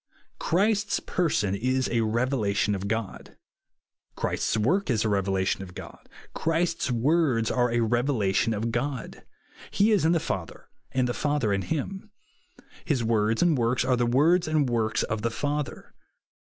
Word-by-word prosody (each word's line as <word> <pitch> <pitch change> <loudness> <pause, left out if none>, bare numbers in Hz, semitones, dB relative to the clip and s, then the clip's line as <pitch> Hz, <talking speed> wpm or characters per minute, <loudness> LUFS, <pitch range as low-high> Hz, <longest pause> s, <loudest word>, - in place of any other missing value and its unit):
Christ's 205 +3 +1
person 145 - 0
is 130 +5 0
a 120 -1 +1
revelation 110 -3 0
of 100 0 -3
God. 110 -1 -4 0.8
Christ's - - -1
work 145 - +1
is 110 -3 +1
a - - +1
revelation 95 -1 0
of 90 -2 -10
God. - - -11 0.2
Christ's 165 0 0
words 125 -2 +2
are 125 -1 +2
a 120 0 +1
revelation 115 -3 +1
of 115 +3 -2
God. 125 0 -3 0.5
He 210 +3 +2
is 205 -6 +3
in 160 - +3
the 170 - +2
Father, 95 - -5 0.2
and 130 -1 +1
the 120 - -1
Father 145 -8 0
in 95 - 0
him. 190 - -4 0.7
His 140 -8 0
words 110 +1 +1
and 170 -3 +3
works 120 0 +1
are 130 -1 +3
the 120 -1 +1
words 155 +9 +3
and 155 -3 +2
works 115 -2 0
of 105 0 -3
the 115 - 0
Father. 145 +4 -4
120 Hz, 155 wpm, -26 LUFS, 110-150 Hz, 0.8 s, is